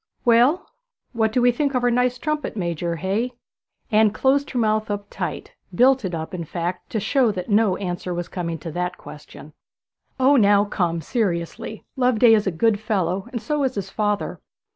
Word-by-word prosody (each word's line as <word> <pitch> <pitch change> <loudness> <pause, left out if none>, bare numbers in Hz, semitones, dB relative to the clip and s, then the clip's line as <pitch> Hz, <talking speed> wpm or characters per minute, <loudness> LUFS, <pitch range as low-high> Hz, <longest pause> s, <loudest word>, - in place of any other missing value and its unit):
'Well, 245 +8 +4 0.5
what 220 -2 +1
do 245 +2 +1
we 245 - +6
think 280 +2 -1
of 250 - +1
our 245 - +3
nice 250 +1 +1
trumpet 305 -2 -3
major, 170 -2 -2
hey?' 200 +9 -2 0.6
Anne 215 0 +5
closed 270 +6 +1
her 255 - -4
mouth 215 -2 +1
up 205 0 -3
tight, - - -5 0.2
built 260 +1 +4
it 180 -3 -3
up, 160 +2 -6
in 175 -2 -4
fact, 175 +3 -4
to 220 - -1
show 240 +2 +2
that 185 +2 -5
no 205 -3 +3
answer 180 -1 -4
was 175 0 -3
coming 170 -2 -4
to 165 - -6
that 180 +2 -3
question. 150 0 -12 0.7
'O 270 +2 +5
now, 205 -2 +5
come, 170 -5 -1
seriously, 185 - -3
Loveday 250 -3 +4
is 210 -2 +2
a - - +2
good 205 +5 +1
fellow, 195 -2 -1
and 235 -4 -5
so 300 -2 -1
is 260 -1 -1
his 195 -2 -4
father.' 210 -1 -2
215 Hz, 185 wpm, -22 LUFS, 180-245 Hz, 0.7 s, we